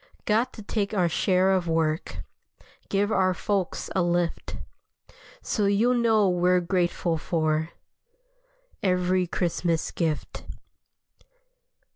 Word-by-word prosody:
Got 230 +4 +1
to 215 - -10
take 205 0 -2
our 180 -3 +3
share 185 +2 +2
of 185 -2 +1
work, 160 -1 -1 0.7
Give 205 +2 +1
our 185 -2 +2
folks 195 -1 -2
a 190 - +3
lift. 175 -1 -1 0.9
So 210 -3 0
you'll 215 +5 +3
know 225 -4 +3
we're 180 0 +3
grateful 175 -2 0
for 155 -1 0 1.1
Every 180 -2 +1
Christmas 170 -1 -1
gift. 160 -3 -3
180 Hz, 105 wpm, -26 LUFS, 170-200 Hz, 1.1 s, our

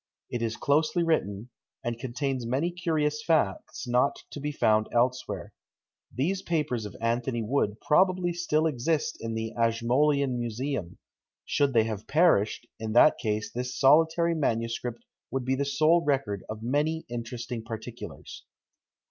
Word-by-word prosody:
It 120 - -2
is 115 -1 -2
closely 155 +4 +2
written, 115 - -1 0.3
and 120 0 -3
contains 130 0 -2
many 140 +8 0
curious 155 -4 -1
facts 150 - 0
not 125 +3 +2
to - - -6
be 145 +1 -2
found 110 -6 +2
elsewhere. 120 -5 -1 0.6
These 185 +9 -1
papers 150 -9 -1
of 100 - -12
Anthony 120 +1 -1
Wood 110 -3 0
probably 180 +2 +3
still 160 -2 +1
exist 155 +2 0
in 115 0 -3
the 110 0 -3
Ashmolean 125 +4 +2
Museum; 120 -4 -3 0.5
should 140 -2 +1
they 115 -2 +5
have 110 -1 -5
perished, 145 - +3
in 110 -1 -3
that 120 +6 +6
case 105 -1 -2
this 125 +1 -4
solitary 160 +4 +4
manuscript 115 -4 -2 0.2
will 135 +1 -2
be 130 +1 0
the 140 +1 0
sole 155 +5 +3
record 135 - 0
of 110 0 -6
many 150 +6 0
interesting 120 0 -5
particulars. 115 +1 -8
125 Hz, 140 wpm, -28 LUFS, 115-150 Hz, 0.6 s, that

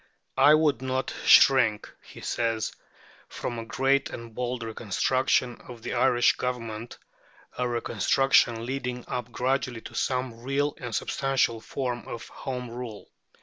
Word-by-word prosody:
"I 150 +1 +8
would 155 -4 +2
not 130 0 -2
shrink," 115 -6 +6
he - - -13
says, 115 -2 -1 0.6
"from 120 -1 -4
a 115 - -6
great 135 +3 +1
and 115 -1 -8
bold 125 0 -3
reconstruction 120 +3 0
of 120 -2 -10
the - - -3
Irish 120 -2 +3
Government," 115 -2 -4 0.6
a 125 0 -1
reconstruction 120 +1 +2
leading 125 -1 -4
up 125 -1 -4
gradually 125 -1 -1
to - - -10
some 125 -3 -2
real 140 +3 0
and 120 -3 -5
substantial 135 -4 0
form 125 0 -4
of 115 - -7
Home 125 -2 -5
Rule. 120 -3 -8
125 Hz, 135 wpm, -27 LUFS, 115-130 Hz, 0.6 s, I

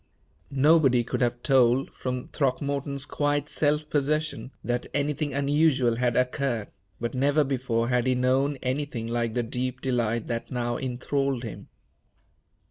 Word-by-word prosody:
Nobody 140 -3 +4
could 125 - -3
have 120 0 0
told, 130 -2 +3
from 125 -1 -4
Throckmorton's 140 0 -1
quiet 145 0 -1
self 150 0 +1
possession, 150 -4 -1
that 120 0 -2
anything 145 0 0
unusual 140 -3 +2
had 125 -1 +1
occurred; 125 -3 0 0.3
but 120 0 -3
never 145 +3 +3
before 125 -4 -1
had 125 0 +1
he 130 - +3
known 130 +3 +2
anything 130 -3 -2
like 115 -1 -1
the 120 - +1
deep 125 +2 -3
delight 120 -3 0
that 115 -1 -4
now 120 -1 -2
enthralled 130 +1 -1
him. 110 - -7
130 Hz, 135 wpm, -26 LUFS, 120-140 Hz, 0.3 s, Nobody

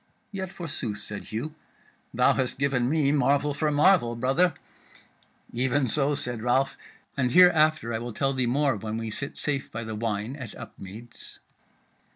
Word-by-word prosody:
"Yet 190 -2 -5
forsooth," 140 - -5
said 105 0 -4
Hugh, 120 +8 -5 0.6
"thou - - +3
hast 130 -2 -1
given 130 -3 +1
me 150 -2 +2
marvel 145 +1 +2
for 155 +1 0
marvel, 145 -5 +4
brother." 135 +8 +2 1.0
"Even 130 +3 +1
so," 145 +4 +1
said 120 -4 -3
Ralph, 130 +3 +1 0.4
"and 130 -3 +1
hereafter 155 -6 +5
I 110 - -1
will 120 +1 -5
tell 135 +5 0
thee 130 -2 0
more 135 +1 +2
when 110 +2 -4
we 115 -1 -4
sit 140 +6 -4
safe 140 -3 -1
by 115 +1 -5
the 110 0 -5
wine 110 +2 -3
at 130 -7 -8
Upmeads." 110 +5 -11
130 Hz, 160 wpm, -26 LUFS, 115-145 Hz, 1.0 s, hereafter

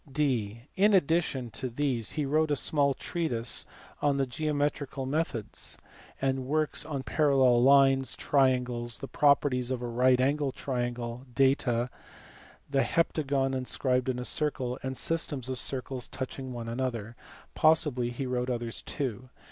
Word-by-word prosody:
(d) 120 -7 -1
In 205 +2 +4
addition 160 -8 +1
to 130 +2 -4
these 125 -3 -1
he 150 -2 -1
wrote 155 +3 +2
a 145 - +2
small 140 0 +2
treatise 125 -10 -1 0.3
on 145 -1 +2
geometrical 145 -1 -2
methods, 135 -6 -3 0.4
and 135 -1 -1
works 155 +1 0
on 145 -3 -4
parallel 135 -6 +3
lines, 135 -1 +5
triangles, 125 -4 +1
the 135 - -7
properties 140 -4 +2
of 125 -2 -2
right 125 +2 +3
angled 140 +1 +1
triangles, 120 -1 -4
data, 125 -3 +2 0.8
the 140 -1 +1
heptagon 140 -5 0
inscribed 130 0 0
in 125 - -1
a 125 - -4
circle, 130 -4 -1
and 130 0 -4
systems 145 -6 0
of 130 -2 -1
circles 130 0 -1
touching 130 0 -6
one 120 -2 -6
another; 115 -2 -3 0.4
possibly 150 -6 +3
he 120 +3 -4
wrote 125 0 -2
others 120 -2 -3
too. 130 -3 -4
130 Hz, 135 wpm, -29 LUFS, 125-145 Hz, 0.8 s, lines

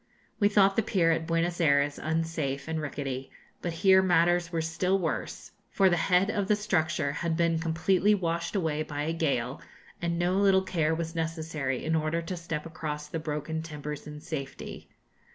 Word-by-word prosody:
We 205 -2 +4
thought 195 -1 +4
the - - +5
pier 175 -5 +2
at 160 0 -1
Buenos 170 +1 0
Ayres 140 -2 +3
unsafe 155 -3 -2
and 160 -1 -2
rickety, 135 -3 -4 0.3
but 175 - -2
here 190 +3 +5
matters 175 -1 +3
were 165 - -1
still 180 +4 +1
worse, 165 -5 -3 0.2
for 190 -2 +3
the - - +4
head 180 +4 +2
of 205 -3 -1
the 210 - +4
structure 160 -8 0
had 165 +2 -2
been 170 -1 +2
completely 175 +5 +2
washed 170 -1 -2
away 160 -5 0
by 145 -1 -3
a 160 +2 -1
gale, 140 -6 -1 0.4
and 170 -1 -1
no 175 +2 +1
little 195 -1 +4
care 160 -4 0
was 165 0 -4
necessary 160 -5 -2
in 160 +1 +1
order 155 +1 0
to 170 +2 -4
step 165 -3 -4
across 150 -2 -5
the 165 - -3
broken 155 +1 -3
timbers 150 -2 -6
in 150 0 -8
safety. 140 -4 -6
165 Hz, 180 wpm, -28 LUFS, 155-175 Hz, 0.4 s, the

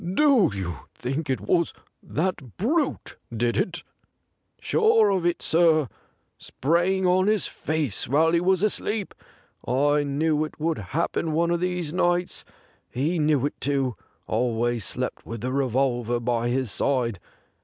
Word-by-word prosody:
' 180 0 -4
Do 275 - +5
you 90 -8 -5
think 135 +4 -3
it 130 - 0
was 170 -2 +1 0.3
that 155 - -3
brute 285 - -1
did 120 +1 0
it 175 -1 -1 0.3
?' - - -50
' - - -49
Sure 225 - +3
of 185 -3 +1
it, 175 - -1
sir; 160 -5 +3 0.5
sprang 175 +6 0
on 185 +1 +3
his 215 -2 +2
face 155 -8 -2
while 155 +6 +3
he 170 0 +2
was 190 +1 +2
asleep. 210 -1 -1 0.5
I 145 +4 +2
knew 150 +2 0
it 155 - -7
would 160 -2 -1
happen 155 - -2
one 170 +2 +1
of 170 - +1
these 180 -3 -2
nights. 175 0 0 0.5
He 155 +7 -1
knew 150 -3 +2
it 145 - -4
too; 135 -4 0 0.3
always 120 -1 0
slept - - -3
with 115 -1 -7
the 130 +2 -2
revolver 125 -3 0
by 120 0 0
his 125 -3 -1
side. 120 -4 0
155 Hz, 155 wpm, -25 LUFS, 125-175 Hz, 0.5 s, Do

